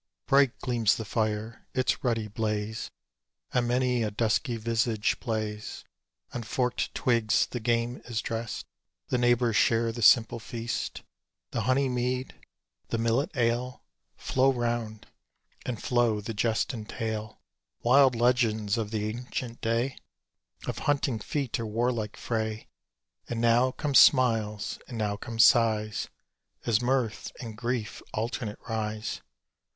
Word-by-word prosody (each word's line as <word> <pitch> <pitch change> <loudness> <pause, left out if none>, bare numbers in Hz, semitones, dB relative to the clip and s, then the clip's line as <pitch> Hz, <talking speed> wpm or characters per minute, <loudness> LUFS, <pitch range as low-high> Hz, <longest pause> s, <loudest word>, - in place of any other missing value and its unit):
Bright 135 -2 +4
gleams 120 -4 +2
the 110 - -5
fire: 110 +1 -2
its 130 0 +1
ruddy 115 -4 0
blaze 105 0 -2 0.6
On 120 -1 +2
many 125 0 +1
a 110 - 0
dusky 115 +4 0
visage 115 -1 0
plays. 110 -2 -4 0.5
On 120 - -3
forkèd 125 +2 -1
twigs 115 -3 +2
the 125 - -5
game 120 +1 0
is 120 -3 -2
drest; 115 0 -4 0.4
The 125 - +1
neighbours 120 -2 +3
share 115 0 +3
the 120 +1 -6
simple 115 0 +5
feast: 115 +1 -4 0.5
The - - -1
honey 135 +1 +3
mead, 125 +1 -1 0.5
the 115 - -1
millet 115 +4 +1
ale, 120 +1 0 0.3
Flow 130 +1 +2
round 120 -3 -2 0.6
and 125 -3 -3
flow 120 -3 +2
the 110 +2 -5
jest 110 +4 0
and 110 -2 -7
tale; 110 -2 -4 0.4
Wild 130 +1 +6
legends 115 -3 +2
of 110 -2 -2
the 105 -1 -2
ancient 120 +1 -5
day, 115 +4 0 0.7
Of - - -3
hunting 135 -5 +1
feat, 135 +1 -2
of 115 - -3
warlike 115 -1 -1
fray; 110 -2 -3 0.6
And 115 - -2
now 120 +2 +4
come 145 +2 -3
smiles, 110 -6 +4
and 120 - -6
now 105 -2 0
come 115 +2 -7
sighs, 110 -3 +4 0.6
As 115 -1 +2
mirth 125 -3 0
and 115 -3 -7
grief 120 -1 -3
alternate 110 -1 -3
rise. 110 -1 -3
115 Hz, 135 wpm, -28 LUFS, 110-125 Hz, 0.7 s, Wild